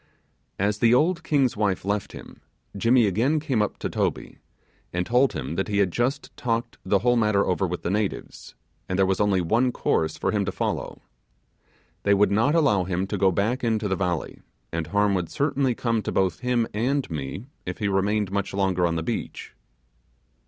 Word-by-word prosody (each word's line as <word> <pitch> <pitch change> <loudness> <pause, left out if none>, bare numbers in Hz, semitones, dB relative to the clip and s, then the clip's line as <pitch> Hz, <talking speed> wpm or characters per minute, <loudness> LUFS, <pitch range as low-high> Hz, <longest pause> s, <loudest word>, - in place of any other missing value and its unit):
As 105 +2 0
the 115 +1 +5
old 170 +5 +2
king's 140 -6 +2
wife 100 -3 0
left 100 0 -1
him, - - -12 0.3
Jimmy 115 +4 +4
again 120 - +1
came 135 -7 0
up 105 - -1
to - - -3
Toby, - - -2 0.5
and 90 0 -1
told 125 +5 +3
him 75 -1 -4
that 95 - 0
he 100 -1 -1
had 100 -3 +2
just 130 - -2
talked 115 -1 -2
the 100 - +2
whole 120 0 +4
matter 105 -3 +2
over 95 +1 0
with 90 0 -5
the 85 - -1
natives, 105 0 -3 0.3
and 95 - -1
there 95 - +4
was 95 0 0
only 100 -3 +2
one 115 +9 +2
course 80 -8 0
for - - 0
him - - +1
to - - -2
follow. - - -3 1.0
They 100 0 +3
would 100 +1 +3
not 115 +10 +2
allow 135 - +3
him 90 +1 -1
to 95 - -4
go 95 -1 +4
back 110 +9 0
into 110 -2 0
the 95 - 0
valley, 90 -4 -3 0.3
and 85 -1 -3
harm 105 0 +2
would 90 -3 -1
certainly 140 -4 0
come 115 -2 0
to - - -4
both 95 -4 0
him 125 -2 +1
and 130 +6 0
me, 75 - -5 0.2
if 90 - -4
he 105 - -1
remained 100 +1 0
much 100 -1 -2
longer 95 -3 +1
on 85 - -1
the 80 - -2
beach. - - -5
105 Hz, 195 wpm, -25 LUFS, 95-120 Hz, 1.0 s, the